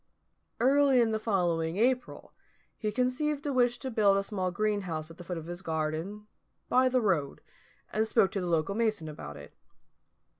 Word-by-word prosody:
Early 270 +1 +4
in 230 -2 +3
the 220 - 0
following 175 -6 0
April 250 +3 0 0.4
he 215 -1 -2
conceived 275 +6 -1
a 285 - -1
wish 245 -1 +3
to 260 +1 -5
build 205 -3 +4
a 195 - +1
small 190 -3 -2
greenhouse 180 -5 -2
at 165 - -15
the - - -7
foot 175 0 -5
of 160 - -7
his 175 +2 -6
garden, 160 +5 -3 0.4
by 255 +1 +4
the 255 0 +2
road, 165 -10 0 0.5
and 220 +1 +1
spoke 195 - +3
to 195 - -2
the 180 - -3
local 165 +3 +1
mason 215 -6 0
about 75 - -8
it. 70 0 -12
205 Hz, 180 wpm, -29 LUFS, 170-245 Hz, 0.5 s, Early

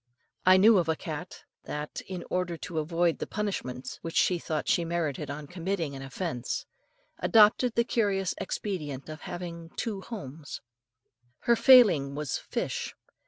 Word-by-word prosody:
I 185 0 +8
knew 210 +1 +7
of 165 -2 -1
a 160 - +2
cat 160 +3 -7 0.2
that, 150 0 -5
in 185 -2 -5
order 180 -2 -1
to 165 -1 -4
avoid 165 0 +1
the - - -3
punishment 190 -12 -4
which 165 0 -6
she 180 -2 +3
thought 155 -2 -3
she 170 - +3
merited 160 -4 -2
on 145 +1 -5
committing 170 -2 -3
an 135 - -7
offence, 135 -2 -4 0.5
adopted 225 +2 +5
the 235 - +4
curious 200 -6 0
expedient 155 -10 -4
of 155 0 -8
having 170 -2 -6
two 210 -5 -3
homes. 160 - -7 0.8
Her 235 - +4
failing 195 - +6
was 150 -2 -2
fish. - - -3
170 Hz, 150 wpm, -28 LUFS, 150-195 Hz, 0.8 s, I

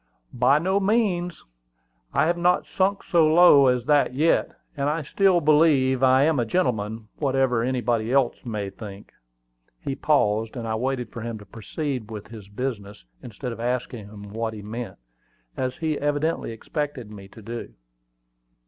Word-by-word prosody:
"By 125 +3 +4
no 190 +5 +1
means: 195 -4 0 0.7
I - - +2
have 170 +2 +2
not 175 +1 +2
sunk 195 +1 0
so 170 -3 +3
low 155 -5 +7
as 125 -1 +1
that 145 -3 +3
yet; 160 +4 +2 0.3
and 140 0 0
I 155 +1 -1
still 190 +4 +3
believe 145 -4 +4
I 130 +1 +5
am 155 -2 +2
a - - +2
gentleman, 110 - -1
whatever 135 -4 +1
anybody 120 -2 0
else 135 -3 +1
may 105 -5 -4
think." 100 -1 -10 0.7
He 140 - -4
paused, 115 -7 +1
and 115 -1 -4
I 110 - -1
waited 125 +1 -2
for 115 - -7
him 115 0 -4
to 105 - -13
proceed 120 - -5
with 105 -2 -8
his 110 -3 -10
business, 105 - -5 0.2
instead 125 +2 -6
of 115 - -8
asking 120 -2 -3
him 105 -1 -11
what 110 0 -3
he 105 - -9
meant, 115 +3 -6 0.6
as 130 0 -2
he 155 -2 -1
evidently 145 -1 -1
expected 135 -1 -5
me 100 -2 -10
to 110 +3 -14
do. 115 +2 -7
125 Hz, 165 wpm, -24 LUFS, 110-150 Hz, 0.7 s, low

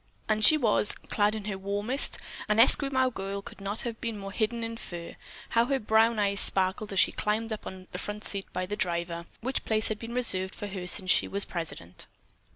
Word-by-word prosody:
And 215 0 +1
she 310 - +9
was, 220 -6 +2 0.2
clad 210 0 +1
in 215 -2 -6
her 200 -2 -4
warmest; 205 +7 +2 0.3
an 210 +1 +2
Esquimaux 260 +1 +4
girl 195 -2 -5
could 200 - -12
not 200 +2 -3
have 230 -2 -6
been 230 -3 -4
more 195 -1 -7
hidden 230 +2 -2
in 230 0 -4
fur. 170 -5 -8 0.3
How 230 0 +2
her 275 +2 0
brown 220 +1 +2
eyes 200 -1 +2
sparkled 190 +2 +2
as 195 - 0
she - - +4
climbed 220 +1 -2
up 215 - -8
on 185 -1 -9
the 180 - -6
front 210 +1 -6
seat 200 -1 +4
by 185 - -3
the 205 +3 -4
driver, 170 -2 -3
which 260 +3 -2
place 220 0 0
had 215 -1 -4
been 235 +1 -7
reserved 190 -6 0
for - - -7
her 190 -3 -6
since 185 0 +5
she - - +3
was 200 0 -1
president. 95 - -7
210 Hz, 215 wpm, -27 LUFS, 190-225 Hz, 0.3 s, she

